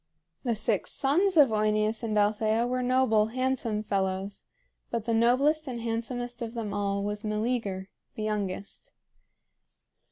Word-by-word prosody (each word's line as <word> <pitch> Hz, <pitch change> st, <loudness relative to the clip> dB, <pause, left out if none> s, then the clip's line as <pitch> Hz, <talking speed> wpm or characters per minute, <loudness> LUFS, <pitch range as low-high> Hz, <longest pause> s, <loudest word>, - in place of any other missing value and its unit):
The 240 Hz, -4 st, 0 dB
six 215 Hz, -2 st, 0 dB
sons 340 Hz, +7 st, +2 dB
of 285 Hz, -4 st, +8 dB
OEneus 215 Hz, +1 st, +1 dB
and 220 Hz, -2 st, -1 dB
Althea 215 Hz, +2 st, +2 dB
were 250 Hz, +1 st, -1 dB
noble, 250 Hz, -4 st, +3 dB
handsome 240 Hz, -3 st, -1 dB
fellows; 195 Hz, -1 st, -2 dB, 0.4 s
but 230 Hz, -2 st, -2 dB
the 230 Hz, -, 0 dB
noblest 275 Hz, +7 st, +3 dB
and 245 Hz, -2 st, -4 dB
handsomest 240 Hz, +1 st, -3 dB
of 230 Hz, 0 st, -5 dB
them 215 Hz, -3 st, -3 dB
all 200 Hz, -1 st, -1 dB
was 205 Hz, +1 st, -3 dB
Meleager, 215 Hz, -3 st, -2 dB, 0.3 s
the 215 Hz, -, -4 dB
youngest. 200 Hz, -2 st, -4 dB
225 Hz, 135 wpm, -28 LUFS, 210-245 Hz, 0.4 s, of